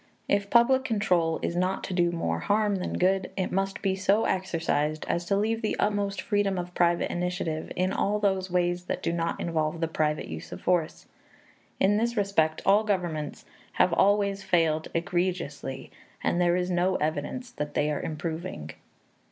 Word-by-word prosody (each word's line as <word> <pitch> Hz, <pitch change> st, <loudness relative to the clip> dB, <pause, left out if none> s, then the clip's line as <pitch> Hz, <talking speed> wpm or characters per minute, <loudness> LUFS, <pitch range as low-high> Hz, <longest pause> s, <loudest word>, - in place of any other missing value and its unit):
If 200 Hz, 0 st, +1 dB
public 260 Hz, +3 st, +5 dB
control 185 Hz, -9 st, +1 dB
is 170 Hz, -, -1 dB
not 185 Hz, +2 st, 0 dB
to 190 Hz, -, -4 dB
do 175 Hz, -1 st, +2 dB
more 85 Hz, -, -1 dB
harm 205 Hz, -, +1 dB
than 180 Hz, -, -3 dB
good, 190 Hz, +1 st, +2 dB
it 185 Hz, -, -1 dB
must 195 Hz, +1 st, -1 dB
be 190 Hz, -1 st, +1 dB
so 200 Hz, +3 st, +2 dB
exercised 160 Hz, -4 st, -1 dB
as 170 Hz, -, -1 dB
to 195 Hz, +3 st, +1 dB
leave 225 Hz, +2 st, 0 dB
the 215 Hz, -, 0 dB
utmost 205 Hz, -2 st, 0 dB
freedom 205 Hz, -3 st, +1 dB
of 180 Hz, 0 st, -4 dB
private 170 Hz, -1 st, +2 dB
initiative 175 Hz, -3 st, -2 dB
in 185 Hz, +1 st, 0 dB
all 205 Hz, +1 st, +1 dB
those 190 Hz, -2 st, 0 dB
ways 175 Hz, 0 st, 0 dB
that -, -, -3 dB
do 170 Hz, -, 0 dB
not 170 Hz, 0 st, -1 dB
involve 160 Hz, -1 st, -1 dB
the 165 Hz, -, 0 dB
private 155 Hz, -1 st, -1 dB
use 80 Hz, 0 st, -7 dB
of 90 Hz, -, -6 dB
force. 175 Hz, -3 st, 0 dB, 0.7 s
In 205 Hz, +2 st, +4 dB
this 235 Hz, +1 st, 0 dB
respect 165 Hz, -6 st, +1 dB
all 200 Hz, +3 st, +5 dB
governments 175 Hz, -8 st, -2 dB, 0.3 s
have 180 Hz, -, +3 dB
always 200 Hz, +1 st, +3 dB
failed 160 Hz, -4 st, +1 dB
egregiously, 170 Hz, -6 st, -2 dB, 0.3 s
and 175 Hz, -, +1 dB
there 175 Hz, 0 st, +3 dB
is 180 Hz, 0 st, -1 dB
no 180 Hz, +1 st, +2 dB
evidence 155 Hz, -, -2 dB
that 150 Hz, -9 st, -5 dB
they 150 Hz, +1 st, +1 dB
are 145 Hz, -, -2 dB
improving. 160 Hz, -, -5 dB
180 Hz, 175 wpm, -27 LUFS, 165-200 Hz, 0.7 s, public